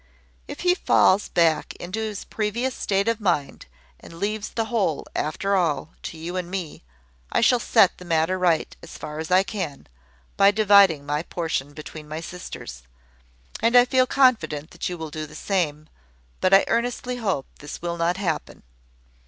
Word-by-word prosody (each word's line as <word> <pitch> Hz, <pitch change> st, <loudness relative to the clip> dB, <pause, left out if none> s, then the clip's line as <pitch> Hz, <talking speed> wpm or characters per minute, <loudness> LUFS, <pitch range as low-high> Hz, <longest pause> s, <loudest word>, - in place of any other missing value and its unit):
If -, -, -7 dB
he 360 Hz, 0 st, +4 dB
falls 200 Hz, -, +3 dB
back 165 Hz, -2 st, +1 dB
into 185 Hz, +5 st, -5 dB
his 215 Hz, -2 st, -4 dB
previous 230 Hz, +5 st, -2 dB
state 200 Hz, -1 st, 0 dB
of 230 Hz, -1 st, 0 dB
mind, 170 Hz, -8 st, -1 dB, 0.3 s
and -, -, -13 dB
leaves 210 Hz, +4 st, -3 dB
the 225 Hz, -, -2 dB
whole, 210 Hz, -9 st, -1 dB
after 190 Hz, +7 st, -1 dB
all, 160 Hz, -4 st, 0 dB
to 165 Hz, -, -7 dB
you 170 Hz, +3 st, -5 dB
and 180 Hz, -1 st, -3 dB
me, 180 Hz, -5 st, -5 dB, 0.5 s
I -, -, +2 dB
shall 245 Hz, +2 st, +4 dB
set 220 Hz, -5 st, +3 dB
the -, -, -10 dB
matter 165 Hz, +2 st, +1 dB
right, 170 Hz, -3 st, +1 dB
as -, -, -11 dB
far 150 Hz, 0 st, -7 dB
as 160 Hz, -, -5 dB
I 185 Hz, +1 st, +5 dB
can, 185 Hz, -9 st, -5 dB, 0.5 s
by 195 Hz, -, +7 dB
dividing 200 Hz, -7 st, +5 dB
my 145 Hz, +1 st, -1 dB
portion 160 Hz, -5 st, -3 dB
between 155 Hz, 0 st, -9 dB
my 155 Hz, +1 st, -4 dB
sisters: 165 Hz, -, -8 dB, 0.8 s
and 230 Hz, +2 st, +2 dB
I 245 Hz, 0 st, +8 dB
feel 255 Hz, 0 st, +3 dB
confident 175 Hz, -, +2 dB
that 175 Hz, -, -4 dB
you 180 Hz, -, -5 dB
will 160 Hz, -2 st, -6 dB
do 155 Hz, 0 st, -5 dB
the -, -, -14 dB
same; 155 Hz, -6 st, -1 dB, 0.5 s
but 185 Hz, -, +2 dB
I 195 Hz, 0 st, +7 dB
earnestly 245 Hz, +2 st, -1 dB
hope 195 Hz, -, -1 dB
this 145 Hz, +1 st, -8 dB
will 170 Hz, 0 st, -3 dB
not 170 Hz, +2 st, 0 dB
happen. 175 Hz, -6 st, -3 dB
180 Hz, 175 wpm, -24 LUFS, 160-210 Hz, 0.8 s, I